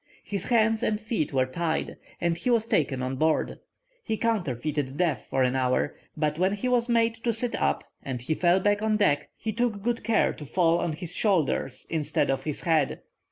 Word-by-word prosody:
His 200 -3 -4
hands 225 -2 +3
and 210 -1 0
feet 215 -8 -2
were 130 -2 +2
tied, 160 +5 -2 0.2
and 170 -1 +1
he 210 - -2
was 230 -2 +3
taken 145 - 0
on 130 +1 -2
board. 155 +2 +1 0.4
He 220 - -2
counterfeited 150 - -1
death 165 -5 0
for 135 - +2
an 125 0 +1
hour, 130 +2 +1 0.2
but 150 0 0
when 190 +2 +2
he 205 +5 -2
was 245 -1 +2
made 230 -1 +3
to 235 - +2
sit 230 +2 -1
up, - - 0 0.2
and 130 -2 -4
he 125 +6 -1
fell 175 +3 +3
back 205 +2 +2
on 215 -1 +2
deck, 145 -9 +2
he 220 - -3
took 220 -3 -1
good 235 +1 -1
care 220 0 +2
to - - -9
fall 170 +1 +3
on 170 -2 -1
his 175 +2 -5
shoulders 165 - +1
instead 155 -4 +1
of 135 - -2
his 150 -2 -3
head. 160 -5 +1
175 Hz, 205 wpm, -27 LUFS, 145-220 Hz, 0.4 s, hands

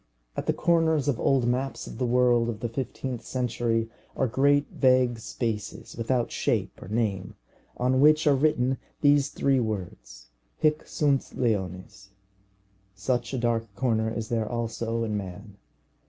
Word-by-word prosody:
At - - -4
the - - +3
corners 160 -3 +2
of 135 -5 +1
old 135 -3 +2
maps 130 +3 -1
of - - -9
the 125 - +1
world 120 -1 +3
of 110 -2 -5
the 120 - -2
fifteenth 125 0 -4
century 120 -2 -1 0.3
are 135 - +1
great 140 +4 +3
vague 130 -3 +3
spaces 110 -2 -4
without 120 +1 0
shape - - -1
or - - -9
name, 105 -3 -2 0.4
on 130 +1 +2
which 155 +1 +5
are 145 - +5
written 135 -3 +1 0.2
these 145 -1 +4
three 135 -1 +1
words, 85 - -5 0.3
Hic 155 0 +1
sunt 140 -3 0
leones. 95 -4 -2 0.9
Such 120 +3 -1
a 135 - -2
dark 115 -3 -1
corner 110 0 +1
is 115 -1 -4
there 110 -2 -1
also 115 -1 -2
in 110 -2 -2
man. 100 +1 -8
120 Hz, 150 wpm, -27 LUFS, 110-135 Hz, 0.9 s, which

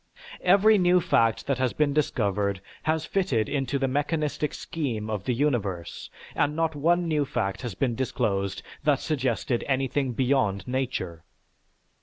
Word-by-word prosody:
Every 200 +3 +5
new 180 0 +5
fact 115 -10 +2
that 135 -2 -1
has 130 -2 +1
been 150 -2 +1
discovered 100 -9 0 0.2
has 160 0 0
fitted 140 - 0
into 140 -1 -1
the 135 -1 0
mechanistic 150 +2 -1
scheme 115 -9 -3
of 100 -3 -3
the 125 - +1
universe, 105 - -2 0.2
and 150 +1 +1
not 165 0 0
one 170 +4 +2
new 155 -2 +1
fact 95 -7 -2
has 120 -7 -5
been 125 +3 0
disclosed 105 -6 -1 0.2
that 145 -2 +3
suggested 130 -4 -1
anything 135 -1 0
beyond 125 -7 +1
nature. 125 -10 -3
135 Hz, 145 wpm, -26 LUFS, 110-150 Hz, 0.2 s, Every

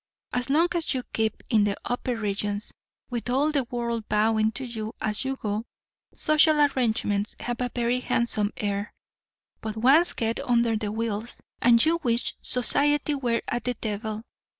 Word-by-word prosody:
As 245 +2 -1
long 320 +5 +4
as 335 -5 0
you 255 - -2
keep 220 -1 -1
in 215 -3 +5
the 205 -1 +1
upper 245 0 -2
regions, 205 -1 -2 0.4
with 240 0 -3
all 280 +5 +2
the 280 -4 0
world 235 -2 -3
bowing 220 +1 +2
to 260 +2 -5
you 225 -1 -5
as 210 -1 -1
you 270 0 -2
go, 215 -3 -3 0.5
social 305 0 +4
arrangements 225 -7 +1
have 240 0 -4
a 250 - 0
very 240 +1 +1
handsome 225 -4 0
air; 205 0 -3 0.7
but 220 0 -5
once 280 +10 +5
get 225 -1 -1
under 235 -2 +2
the 210 -1 -2
wheels, 225 +1 -3 0.2
and 235 +2 +6
you 335 +1 +2
wish 235 -3 0
society 290 +4 +2
were 245 -4 0
at 240 -2 -2
the 250 0 0
devil. 215 0 -4
235 Hz, 165 wpm, -26 LUFS, 215-255 Hz, 0.7 s, and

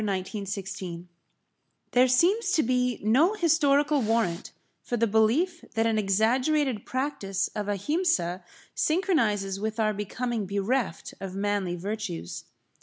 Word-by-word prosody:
[Pg - - -2
19] 195 +1 -3
AHIMSA 190 -3 -5 0.9
There 250 +1 +5
seems 350 - +3
to 315 - +3
be 250 0 0
no 285 - +4
historical 295 -5 +3
warrant 220 -7 0 0.3
for 240 - -3
the 230 - +3
belief 235 - +2
that 225 0 +2
an 225 -1 +2
exaggerated 240 +5 +1
practice 205 -8 -2
of 210 -1 -5
Ahimsa 205 - 0 0.3
synchronises 225 - +1
with 220 +2 -3
our 215 -1 +2
becoming 215 +1 -3
bereft 200 +1 -1
of 190 -1 -6
manly 200 -3 -1
virtues. 195 - -5
220 Hz, 125 wpm, -27 LUFS, 195-270 Hz, 0.9 s, There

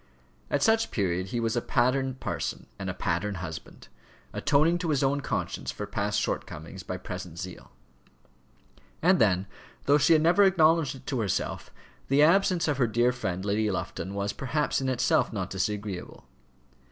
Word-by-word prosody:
At 145 -1 +1
such 225 0 +3
period 95 -3 -1
he 120 - -2
was 115 0 0
a 120 - +1
pattern 130 +2 +1
parson - - -4
and - - -3
a - - -2
pattern 105 -1 -1
husband, 85 -7 -8 0.5
atoning 160 +5 +2
to 170 -2 -2
his 145 -2 +1
own 140 +1 +1
conscience - - -3
for 105 - -4
past 105 0 -1
shortcomings 80 +5 -4
by 90 0 -5
present 90 -2 -7
zeal. 90 0 -8 1.3
And 185 +2 +5
then, 95 -3 +3 0.4
though 145 +1 +5
she 165 - +5
had 155 -1 +4
never 175 +5 +5
acknowledged 165 -6 +4
it 130 0 -13
to 130 - -2
herself, 100 -5 -2 0.4
the 140 +2 +4
absence 175 +1 +4
of 145 -3 0
her 125 -3 +3
dear 120 +3 +2
friend 95 -7 -3
Lady 105 +1 +1
Lufton 95 0 -4
was 100 0 -1
perhaps 145 +2 -1
in 130 - 0
itself 125 -1 +2
not 95 -4 -4
disagreeable. 100 0 -3
120 Hz, 165 wpm, -28 LUFS, 95-150 Hz, 1.3 s, And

